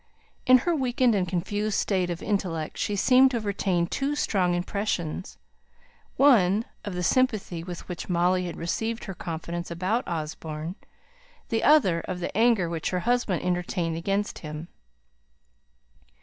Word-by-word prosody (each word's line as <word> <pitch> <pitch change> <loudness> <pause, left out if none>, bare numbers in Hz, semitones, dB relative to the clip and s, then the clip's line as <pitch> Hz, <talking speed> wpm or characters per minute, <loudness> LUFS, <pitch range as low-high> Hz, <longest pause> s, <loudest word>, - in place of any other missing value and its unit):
In 255 0 +9
her 345 -1 +2
weakened 255 -3 +2
and 190 -3 +1
confused 200 +4 -1
state 185 -3 0
of 175 0 -4
intellect 180 -7 -2
she 205 - -1
seemed 255 +6 +5
to 250 - -1
have 220 - -5
retained 185 -4 0
two 280 +2 -1
strong 185 -10 +1
impressions 180 -2 -3 0.8
one, 220 -6 +5 0.2
of 200 -3 -5
the 180 - -2
sympathy 210 -6 +1
with 175 -1 -8
which 180 0 -6
Molly 180 +1 +2
had 170 - -6
received 225 +7 -2
her 195 - -5
confidence 170 0 -5
about 185 +8 -1
Osborne; 155 0 -4 0.8
the 225 -1 0
other, 225 - +5
of 180 - -3
the 175 - -4
anger 225 -5 +3
which 165 -2 -2
her 180 -1 -1
husband 240 -6 0
entertained 180 -2 -1
against 195 +5 -2
him. 155 +1 -7
185 Hz, 150 wpm, -26 LUFS, 170-220 Hz, 0.8 s, In